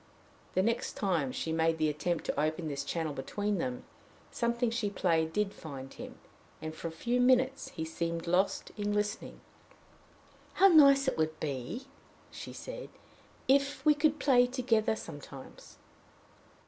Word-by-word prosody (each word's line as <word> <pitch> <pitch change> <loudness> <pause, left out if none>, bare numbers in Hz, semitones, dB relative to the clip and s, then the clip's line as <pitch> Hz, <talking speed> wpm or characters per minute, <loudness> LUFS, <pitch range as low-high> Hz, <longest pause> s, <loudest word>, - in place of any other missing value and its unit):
The 185 - +3
next 230 +3 0
time 170 -10 0
she 160 - -3
made 160 0 +2
the 155 -1 +2
attempt 155 +3 -1
to - - -2
open 155 +2 0
this 140 -2 -3
channel 160 +1 -2
between 205 +9 -2
them, 125 -5 -3 0.5
something 235 0 0
she 230 -3 -1
played 165 -5 +1
did 210 +2 0
find 135 -4 -8
him, - - -9 0.4
and 155 0 -5
for 160 - -6
a - - -5
few 240 +9 0
minutes 260 +1 +3
he 160 - -5
seemed 165 +1 -3
lost 180 +3 +1
in 205 -1 -1
listening. 210 0 -2 1.1
"How 390 +1 +6
nice 275 -4 +7
it 260 - 0
would 155 0 0
be," 145 - -4 0.5
she - - -8
said, - - -8 0.6
"if 280 +2 +2
we 305 - +7
could 300 0 +2
play 250 -3 +5
together 230 -4 +1
sometimes!" 145 -7 -10
190 Hz, 150 wpm, -31 LUFS, 160-245 Hz, 1.1 s, nice